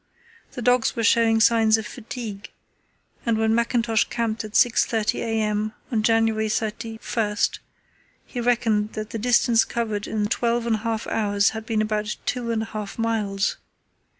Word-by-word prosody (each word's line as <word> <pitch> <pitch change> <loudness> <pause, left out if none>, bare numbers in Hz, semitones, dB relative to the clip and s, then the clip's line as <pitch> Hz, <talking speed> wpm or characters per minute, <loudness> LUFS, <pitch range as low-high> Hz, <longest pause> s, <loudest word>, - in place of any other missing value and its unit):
The 245 - -6
dogs 245 0 +2
were 230 - -1
showing 225 0 +4
signs 225 -1 +4
of 220 - -5
fatigue, 220 -3 -7 0.7
and 230 -2 +1
when 220 0 +2
Mackintosh 235 -1 +2
camped 230 -2 -2
at 215 -1 -9
6.30 225 -3 +2
a.m. 215 -1 -1 0.2
on 225 -3 +1
January 225 -1 +2
31, 220 +1 -3 1.3
he 245 - -5
reckoned 225 -3 +1
that 215 0 -5
the 225 - -4
distance 235 0 +4
covered 215 -3 -3
in 210 -1 -1
twelve 235 +2 0
and 225 -2 +1
a - - -8
half 225 0 -2
hours 205 -1 +1
had 220 0 -7
been 220 -2 +1
about 215 0 -2
two 245 -2 -2
and 225 -1 0
a 225 - -10
half 210 -2 -5
miles. 210 -4 -1
225 Hz, 155 wpm, -24 LUFS, 215-230 Hz, 1.3 s, showing